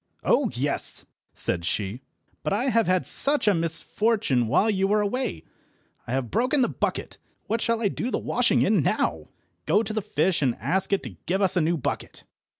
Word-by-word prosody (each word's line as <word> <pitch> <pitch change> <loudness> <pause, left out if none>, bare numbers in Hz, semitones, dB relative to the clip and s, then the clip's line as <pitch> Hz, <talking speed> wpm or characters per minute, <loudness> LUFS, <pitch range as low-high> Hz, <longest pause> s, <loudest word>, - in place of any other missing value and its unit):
"Oh - - +2
yes!" - - 0 0.3
said 85 -1 -2
she, 100 +7 -2 0.4
"but 150 - -3
I 245 +7 +1
have 230 -3 +2
had 185 0 +1
such 285 -4 +2
a 205 - +6
misfortune 165 - +1
while 195 - +3
you 195 -3 +1
were 210 +2 +2
away. 210 - -2 0.6
I 120 - -3
have 130 -3 -2
broken 255 +5 +2
the - - +1
bucket. - - -3 0.3
What 225 +1 -1
shall 230 0 0
I - - +3
do 225 +5 -3
the - - -1
washing - - +1
in - - +3
now? - - -1 0.4
Go 215 - +3
to 220 - -4
the 215 - -1
fish, 175 -1 0
and 130 -4 +1
ask 190 +2 0
it 200 - +1
to 110 -10 -9
give 190 +2 +1
us 190 - +5
a 180 - +3
new 165 +2 +1
bucket." 135 - -5
195 Hz, 195 wpm, -25 LUFS, 145-225 Hz, 0.6 s, a